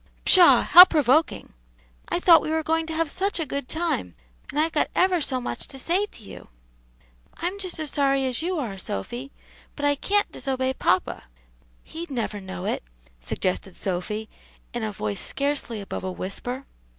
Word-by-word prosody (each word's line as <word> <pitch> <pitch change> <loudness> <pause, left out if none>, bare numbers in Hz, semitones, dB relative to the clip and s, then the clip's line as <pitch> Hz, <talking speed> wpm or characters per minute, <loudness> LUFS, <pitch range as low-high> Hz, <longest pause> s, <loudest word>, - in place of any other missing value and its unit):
"Pshaw! 360 -2 +7
how 355 - +11
provoking. 310 -3 +1 0.6
I - - 0
thought 335 -3 +7
we - - -4
were 320 0 0
going 320 +1 0
to 320 - -4
have 330 0 +1
such 380 +5 -2
a 325 - -1
good 280 -1 -4
time, 315 - -2 0.3
and 295 - -2
I've 320 +2 +2
got - - +1
ever 365 -2 +3
so 260 -3 0
much 120 - -6
to 270 - -10
say 360 +9 0
to 230 - -15
you." - - -11 0.9
"I'm 360 +4 -3
just 370 -3 -4
as 310 -3 -4
sorry 275 -1 +1
as 255 +3 -1
you 355 +2 -2
are, 220 -10 -4
Sophy, 240 - -5 0.4
but 290 - -3
I 290 - +4
can't 405 +8 0
disobey 260 0 -2
papa." 185 -7 0 0.6
"He'd 335 +2 -8
never 225 -6 -3
know 190 -1 -7
it," - - -1 0.4
suggested 180 - -3
Sophy 205 +4 -3 0.5
in 240 - -3
a 215 - -2
voice 105 - -4
scarcely 280 -5 -2
above 200 - -6
a 185 - -3
whisper. 245 +9 -5
275 Hz, 175 wpm, -24 LUFS, 215-325 Hz, 0.9 s, how